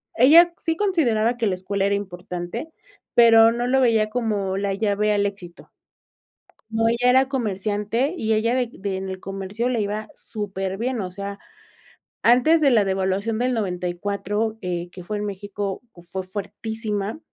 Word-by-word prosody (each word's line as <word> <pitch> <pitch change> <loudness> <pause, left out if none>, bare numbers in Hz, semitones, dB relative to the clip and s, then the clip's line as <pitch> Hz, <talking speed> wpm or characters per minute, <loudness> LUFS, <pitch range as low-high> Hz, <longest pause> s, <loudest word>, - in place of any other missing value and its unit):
ella 330 +8 +7
sí 325 - -1
consideraba 245 - +1
que 230 -3 0
la 185 - 0
escuela 195 +2 -2
era 200 - +2
importante, 180 - -5 0.5
pero 225 -1 +7
no 240 +1 -2
lo 265 +1 +3
veía 225 -3 +3
como 210 -5 -1
la 200 0 -1
llave 210 +1 +1
al 205 -1 +1
éxito. 190 -4 -7 1.0
No, 225 0 +2
ella 240 +2 +3
era 260 +1 +4
comerciante, 215 - -1
y 220 -5 -1
ella 230 +3 +2
de 250 -2 0
de 195 -1 -4
en 190 0 -5
el 190 0 -5
comercio 195 +5 -3
le 240 -3 0
iba 210 +1 -3
superbien. 205 +4 -3
O 185 -2 -4
sea, 200 +1 -6 0.9
antes 255 +8 +5
de 280 - +5
la 215 -4 +4
devaluación 195 +3 -1
del 250 +1 0
94, 200 +2 -2
eh, 175 -1 -3
que 180 - -10
fue 210 +3 -4
en 210 - -3
México, 200 0 -4 0.3
fue 190 +2 -4
fuertísima, 210 +3 -4
210 Hz, 160 wpm, -23 LUFS, 195-235 Hz, 1.0 s, ella